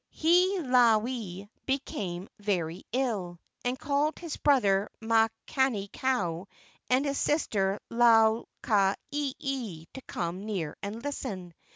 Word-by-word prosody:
Hiilawe 250 - +3 0.2
became 200 -9 -3
very 180 -4 -1
ill, 210 -9 -1 0.2
and 245 +1 -1
called 290 +2 0
his 335 -3 -5
brother 205 -9 +3
Makani 225 0 +1
kau 190 -9 -1 0.4
and 260 +3 +3
his 280 -1 -1
sister 205 -10 +1
Lau 225 -1 +5 0.2
ka 200 -4 +3 0.2
ieie 265 - -3
to 265 - -8
come 175 +3 -3
near 185 -8 -3
and 215 +4 -5
listen. 200 -11 -5
225 Hz, 105 wpm, -29 LUFS, 195-265 Hz, 0.4 s, Lau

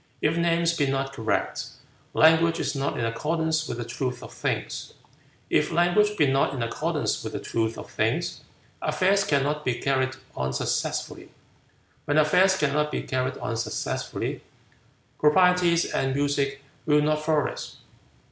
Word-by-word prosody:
If 155 +2 +1
names 170 0 +2
be 145 -4 +1
not 135 0 -1
correct, 115 -5 -1 0.5
language 165 +1 +5
is - - -1
not 140 0 -1
in 115 - 0
accordance 160 +6 -1
with 120 - -4
the 120 - -4
truth 125 +2 -4
of - - -10
things. - - -3 0.5
If - - +1
language 205 +5 +3
be 150 - +4
not 135 0 +2
in 125 - -2
accordance 115 - -1
with - - -5
the - - -3
truth 115 0 -2
of - - -8
things, - - -1 0.4
affairs 195 +2 +2
cannot 150 -3 0
be 125 -4 0
carried 130 0 0 0.2
on 65 0 -2
successfully. 65 - -2 0.8
When 145 - +1
affairs 180 +5 +4
cannot 150 -1 +1
be - - -3
carried 130 0 -2
on 115 - -3
successfully, 115 - -3 0.8
proprieties 175 +2 +4
and 135 0 -1
music 140 -1 0 0.2
will 150 -1 +4
not 155 0 +1
flourish. 155 -3 -1
150 Hz, 145 wpm, -26 LUFS, 135-165 Hz, 0.8 s, language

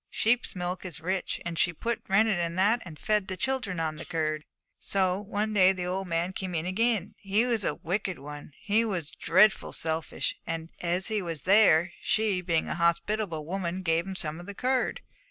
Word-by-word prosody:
Sheep's 240 0 +1
milk 180 0 -3
is 175 -5 -7
rich, 185 +3 -2
and 170 -1 -3
she 175 - +4
put 235 +8 -2
rennet 210 -1 +3
in 170 0 -1
that, 210 +6 +3
and 160 -4 -9
fed 210 0 0
the 185 - -4
children 235 -6 -1
on 155 -1 -2
the 165 - -6
curd. 155 -2 -2 0.3
'So 190 -1 +2
one 210 +1 -2
day 190 -2 +6
the 180 -1 -4
old 190 +1 -2
man 170 +2 -1
came 185 -2 -4
in 160 +1 -1
again. 210 +1 +1
He 205 +4 +2
was 235 -4 0
a - - 0
wicked 185 +1 -2
one; 145 +1 -9
he 215 +2 +2
was 180 -9 -3
dreadful 210 +1 +3
selfish; 160 0 -2
and 165 0 -4
as 180 +3 -1
he 215 -2 0
was 165 -4 -4
there, 185 -4 +5
she, 215 -4 +1
being 170 -3 0
a - - -2
hospitable 170 0 0
woman, 185 +1 -3
gave 165 +1 +1
him 190 - -5
some 160 -2 -4
of 175 - -10
the 205 - -7
curd. 255 - 0
185 Hz, 200 wpm, -28 LUFS, 170-210 Hz, 0.3 s, day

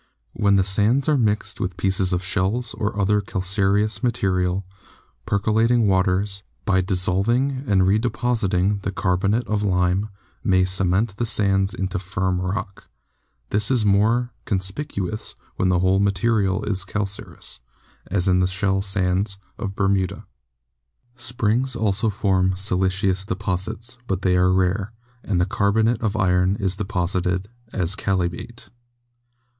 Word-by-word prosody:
When 100 -2 +2
the 95 - +4
sands 105 +8 +2
are 155 - +4
mixed 105 -5 0
with 90 -2 -3
pieces 95 -1 +1
of 90 0 0
shells 100 +6 -1
and 105 - -1
other 105 +1 +2
cal 95 -2 -4
careous 100 +2 +2
material, 95 -5 0 0.6
percolating 110 +3 +2
waters, 95 +1 +1 0.2
by 95 -3 +3
dissolving 100 +9 0
and 100 -3 +3
redepositing 105 -2 +1
the 100 - -2
carbonate 100 +5 0
of 105 -1 -1
lime, 95 +1 +1 0.3
may 95 -4 +3
cement 95 +3 0
the 120 - 0
sands 100 -2 +2
into 95 -2 -2
firm 90 0 -1
rock. 95 +2 -4 0.7
This 105 +1 +2
is 125 -4 +2
the 105 - +3
more 115 +5 +2
conspicuous 100 +1 -3 0.2
when 95 - +2
the 90 - +3
whole 95 +2 +3
material 100 0 +1
is 100 -3 0
calcareous, 100 -9 -5 0.5
as 95 0 0
in 90 -1 +4
the 90 - +3
shell 95 +1 0
sands 95 0 0 0.2
of 100 -3 -4
Bermuda. 95 -2 0 0.9
Springs 120 0 0
also 110 -1 +1
form 95 -2 +1
siliceous 95 -1 0
deposits, 105 +5 -4
but 95 0 -2
they 90 -1 +3
are 90 0 +4
rare, 95 +3 +1 0.3
and 95 -4 0
the 90 - +3
carbonate 110 +4 +1
of 110 -2 -1
iron 90 -1 +2
is 95 -3 -1
deposited 90 -1 -1 0.2
as 95 0 -1
chalybeate. 95 +4 -3
100 Hz, 135 wpm, -22 LUFS, 95-105 Hz, 0.9 s, the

